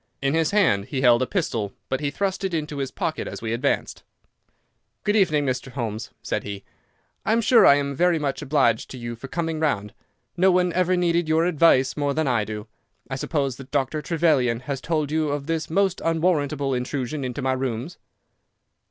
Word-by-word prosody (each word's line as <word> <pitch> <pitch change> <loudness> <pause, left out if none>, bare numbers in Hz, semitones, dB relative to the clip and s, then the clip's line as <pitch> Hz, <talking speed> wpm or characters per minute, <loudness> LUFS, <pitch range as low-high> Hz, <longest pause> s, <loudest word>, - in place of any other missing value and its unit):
In 135 +1 0
his 160 -1 +2
hand 165 - +2
he 130 +2 -3
held 120 -2 +5
a 130 - +1
pistol, 115 - -2
but 130 - -1
he 145 -1 -1
thrust 190 +6 -2
it 190 -3 -1
into 150 -2 -3
his 135 -1 -2
pocket - - -3
as - - -6
we 110 0 -3
advanced. 130 +4 -1 1.0
"Good 205 - +1
evening, 155 -8 +3
Mr. 130 0 -3
Holmes," 115 -3 -4
said - - -2
he. 100 -1 -7 0.6
"I 220 - +1
am 230 - +3
sure 235 +1 +6
I 140 - +8
am 140 -1 -1
very 175 +3 +3
much 145 -3 -2
obliged 135 -6 +1
to 130 - -8
you 120 -1 -5
for 120 +4 -9
coming 165 +1 -2
round. 105 -10 -1 0.4
No 185 +2 +4
one 180 -1 +2
ever 185 0 +2
needed 170 -2 +1
your 160 +1 +3
advice 155 -6 +4
more 145 -1 -1
than 160 -2 0
I 120 -5 +1
do. 105 0 -6 0.5
I - - -1
suppose 135 -2 -2
that 135 -1 -11
Dr. 145 +2 -1
Trevelyan 150 -8 +1
has 135 0 -4
told 155 -3 -1
you 155 -1 +1
of 145 -1 -2
this 160 0 -2
most 190 +2 +1
unwarrantable 155 -4 +1
intrusion 130 +2 -3
into 130 +1 -4
my 130 0 +1
rooms." 130 +4 -4
145 Hz, 195 wpm, -24 LUFS, 130-165 Hz, 1.0 s, I